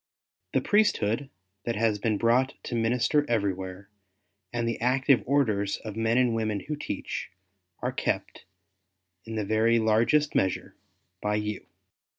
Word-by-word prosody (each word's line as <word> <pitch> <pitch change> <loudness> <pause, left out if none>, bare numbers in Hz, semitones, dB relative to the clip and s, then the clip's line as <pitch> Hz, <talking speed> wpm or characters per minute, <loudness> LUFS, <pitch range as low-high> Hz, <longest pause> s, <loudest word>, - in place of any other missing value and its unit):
The - - +3
Priesthood 140 - +2 0.4
that 115 - -1
has 110 -1 +1
been 110 0 0
brought 120 +4 +2
to - - -6
minister 120 +5 +2
everywhere, 95 -3 -2 0.6
and 120 -1 -1
the 115 - -2
active 130 +1 +3
Orders 110 -8 +1
of 110 -2 -8
men 115 +1 +1
and 125 -2 +3
women 110 -3 -1
who 150 - -4
teach, 145 - -5 0.5
are - - 0
kept - - -3 0.8
in 115 0 -6
the 105 -2 -1
very 110 +3 +3
largest 115 +7 +3
measure, 95 -1 0 0.5
by 105 0 0
you. 105 -1 -3
115 Hz, 140 wpm, -27 LUFS, 105-125 Hz, 0.8 s, The